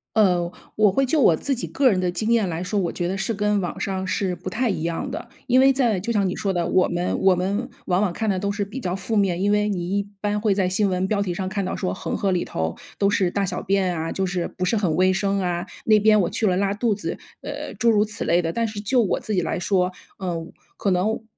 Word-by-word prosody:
呃， 180 -5 +3 0.2
我 210 -2 +4
会 270 +8 +2
就 290 +3 +2
我 170 - +6
自 275 - -1
己 245 - -4
个 275 -2 +3
人 200 - +2
的 180 -1 0
经 220 +5 -1
验 220 -5 +2
来 165 0 -3
说， 185 +3 -2
我 180 -4 0
觉 175 - -2
得 190 +2 -2
是 195 +4 -1
跟 210 0 +1
网 175 - -4
上 190 -1 -2
是 185 -1 -1
不 175 - -6
太 245 +1 0
一 165 -6 -2
样 170 0 -2
的。 - - -6 0.2
因 250 - +4
为 270 +1 +6
在 245 -7 +2
就 235 - -2
像 205 -4 +2
你 180 - -2
说 195 - -1
的， 175 -2 0
我 185 - +3
们 175 +1 -1
我 190 -1 +5
们 200 +7 -1 0.2
往 180 +1 +1
往 205 -4 +1
看 220 +4 -2
的 190 - +1
都 200 +2 -1
是 205 0 -2
比 235 +7 -7
较 180 -5 -2
负 195 +4 -3
面， 190 -4 +2
因 205 +1 +2
为 210 0 +2
你 185 0 -1
一 200 - +1 0.2
般 210 +1 -1
会 210 -2 +3
在 190 -2 +1
新 195 +2 +1
闻 185 0 0
标 205 0 0
题 185 -3 -1
上 185 +2 -3
看 195 +1 -2
到 185 - -3
说 185 - -2
恒 - - -3
河 195 - 0
里 175 - 0
头 80 0 -3 0.2
都 200 - +3
是 190 -3 +1
大 200 +1 0
小 190 - -3
便 190 -3 +1
啊， 160 +1 -3
就 190 - -1
是 180 -1 -2
不 185 - 0
是 205 - +1
很 190 -7 +1
卫 185 +1 +4
生 200 +1 0
啊， 175 -1 -1 0.2
那 215 -1 +6
边 215 0 +5
我 180 - +1
去 225 - -1
了 185 -3 +2
拉 200 0 +1
肚 220 +1 +1
子， 205 - -4 0.2
呃， - - -6
诸 235 - +2
如 210 -2 +4
此 210 -1 -5
类 175 +1 +3
的。 165 -1 -2
但 230 +5 0
是 210 -1 -6
就 245 +4 +2
我 205 - +1
自 215 - -4
己 190 - +2
来 165 - -2
说， 185 0 +1 0.3
嗯， 170 -3 -4 0.2
可 200 - 0
能， 210 +5 0
195 Hz, 300 characters per minute, -23 LUFS, 180-210 Hz, 0.3 s, 我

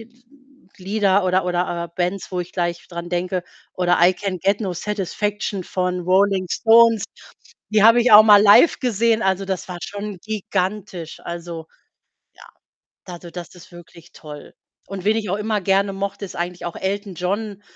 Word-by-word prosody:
n 225 +1 -14
n 245 +1 -29 0.6
Lieder 200 0 +1
oder 185 +1 +1
oder, 175 -1 -2
äh, - - -9
Bands, 180 +2 -3
wo 180 - -1
ich 175 0 -7
gleich 175 -1 -3
dran 170 -1 -7
denke. 180 0 -2 0.3
Oder 180 -1 +1
„I 180 +2 +5
Can 190 0 -4
Get 195 +4 0
No 190 -3 -2
Satisfaction“ 205 +1 -3
von 180 0 -2
Rolling 190 +1 +2
Stones. 230 -2 +4 0.6
Die 215 -1 +2
habe 230 +2 +6
ich 245 - +2
auch 210 +1 +11
mal 210 -2 +7
live 210 +10 +6
gesehen. 230 -2 +1
Also, 190 0 0
das 190 -2 -4
war 180 - -6
schon 205 0 -6
gigantisch. 195 -4 -4
Also, 170 -1 -7 0.7
ja, - - -17 0.6
also, 175 -1 -10
das 175 0 -9
ist 175 - -16
wirklich 170 0 -15
toll. 150 -2 -12 0.3
Und 195 -2 -7
wen 215 +2 +2
ich 215 -2 -3
auch 190 - -1
immer 210 0 -1
gerne 195 +1 +1
mochte, 200 +1 -5
ist 190 - -9
eigentlich 175 +1 -5
auch 175 - -5
Elton 200 0 -4
John. 200 +3 -4
190 Hz, 175 wpm, -21 LUFS, 180-210 Hz, 0.7 s, auch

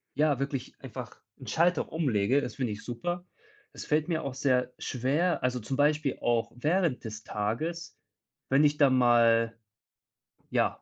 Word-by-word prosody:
ja, 145 -2 +2
wirklich 135 -2 -3
einfach - - -9 0.2
'n - - -11
Schalter 170 0 +1
umlege. 135 -5 +1
Das 120 -6 -5
finde 125 -5 -2
ich 105 - -9
super. 175 +9 -4 0.5
Das - - -8
fällt 150 0 +1
mir 165 -1 -1
auch 140 - -4
sehr 130 -1 +1
schwer. 140 +7 0
Also, 125 0 0
zum 130 +4 -4
Beispiel 150 -1 +2
auch 115 -1 +1
während 155 +2 0
des 110 -1 -7
Tages, 155 +12 -3 0.5
wenn 135 +3 +4
ich 150 0 +3
dann 135 -3 +4
mal, 115 -2 +4 0.9
ja, - - 0
135 Hz, 155 wpm, -29 LUFS, 120-155 Hz, 0.9 s, wenn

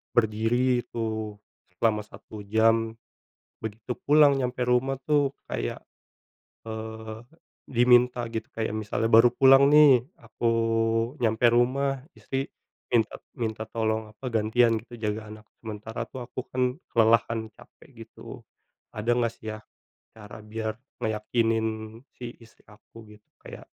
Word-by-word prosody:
berdiri 120 +3 +2
itu 110 -2 -4 0.5
selama 110 -2 +3
1 105 0 -12
jam, 115 +1 +3 0.7
begitu 110 +2 -6 0.2
pulang 145 -1 +6
nyampe 125 0 -1
rumah, 125 +2 +2
tuh, 145 -2 +2 0.2
kayak, - - -3 0.8
eee, 110 0 -7 0.5
diminta 125 0 +4
gitu. 110 0 -4
Kayak 110 -2 -3
misalnya 110 +1 -2
baru 115 +2 +8
pulang, 135 +2 +6
nih, 145 -5 +7 0.2
aku 115 0 -2 0.7
nyampe 110 +1 +2
rumah, 135 +3 +1 0.2
istri 135 +1 -4 0.4
minta 115 -3 +1 0.2
minta 110 -1 -3
tolong 110 -1 -1
apa, 115 +3 -8
gantian 115 +2 +3
gitu 120 0 -12
jaga 110 0 -3
anak. 110 0 -11 0.2
Sementara, 110 0 -6
tuh, 125 -2 -7
aku, 130 +1 -6
kan, 125 0 0 0.2
kelelahan 115 -1 +2
capek - - -19 0.2
gitu. - - -11 0.6
Ada 115 +3 +1
nggak, 120 -1 +1
sih, 110 0 -6
ya, 110 - -9 0.5
cara 105 0 -11
biar 110 0 -4 0.2
ngeyakinin 110 0 -1 0.2
si 120 -1 -9
istri 115 -1 -20
aku 110 +1 -16
gitu, 105 - -38 0.2
kayak - - -11
115 Hz, 125 wpm, -26 LUFS, 110-125 Hz, 0.8 s, baru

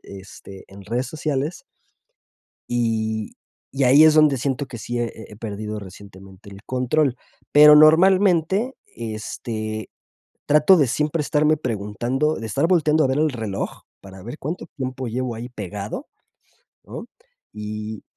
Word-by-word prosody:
este, 95 0 -12
en 100 +1 -13
redes 120 +5 -2
sociales. 150 +1 -3 1.1
Y 110 -2 -2 0.4
y 135 +1 0
ahí 140 +5 +7
es 155 -1 +6
donde 150 -3 +4
siento 135 +2 -2
que 120 - -9
sí 120 +2 -4
he 120 - 0
he 110 -1 -12
he - - -11
perdido 105 0 -5
recientemente 95 0 -13
el 100 +1 -12
control, 130 +2 0 0.4
pero, 150 0 +9
normalmente, 185 - +4
este, 110 -1 -6 0.6
trato 150 +6 +5
de 145 -5 +3
siempre 150 +5 -1
estarme 150 +1 +2
preguntando, 120 +5 -2
de 115 - -6
estar 135 +10 0
volteando 155 -3 +3
a - - +3
ver 130 +1 0
el 155 -1 +2
reloj 110 -6 -5 0.2
para 95 -1 -13
ver 120 +7 -8
cuánto 160 +6 -5
tiempo 130 -1 -4
llevo 125 +1 -3
ahí 120 +2 -7
pegado, 105 - -6 0.8
¿no? - - -8 0.5
Y 105 0 -6
125 Hz, 140 wpm, -22 LUFS, 110-150 Hz, 1.1 s, pero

